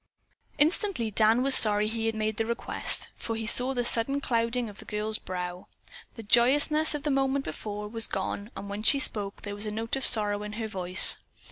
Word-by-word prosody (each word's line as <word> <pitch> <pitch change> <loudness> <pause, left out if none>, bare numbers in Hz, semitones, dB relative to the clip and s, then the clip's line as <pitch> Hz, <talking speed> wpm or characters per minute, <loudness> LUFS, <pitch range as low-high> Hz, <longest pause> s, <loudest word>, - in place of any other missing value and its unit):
Instantly 305 - +1
Dan 220 +4 +3
was 275 0 +7
sorry 210 -3 +6
he 225 0 -3
had 225 - -2
made 215 -1 -3
the 225 - -1
request, 235 0 -2
for 225 - -5
he 225 0 -4
saw 250 +3 +4
the 245 -1 -1
sudden 240 +5 +3
clouding 235 -2 -1
of 205 -1 -12
the - - -11
girl's 215 +1 -4
brow. 180 0 -7 0.5
The 225 - -9
joyousness 290 +8 +3
of 290 - -6
the 295 - -1
moment 270 0 0
before 210 +5 -6
was 225 +1 -3
gone 200 +2 -4
and 195 +1 -7
when 200 +1 -6
she 250 +6 +3
spoke 205 -8 -2
there 205 - -6
was 205 +1 -5
a - - -4
note 225 +3 -3
of 270 - -4
sorrow 205 -3 0
in 210 0 -7
her 220 0 -4
voice. 185 -3 +2
225 Hz, 210 wpm, -27 LUFS, 210-250 Hz, 0.5 s, was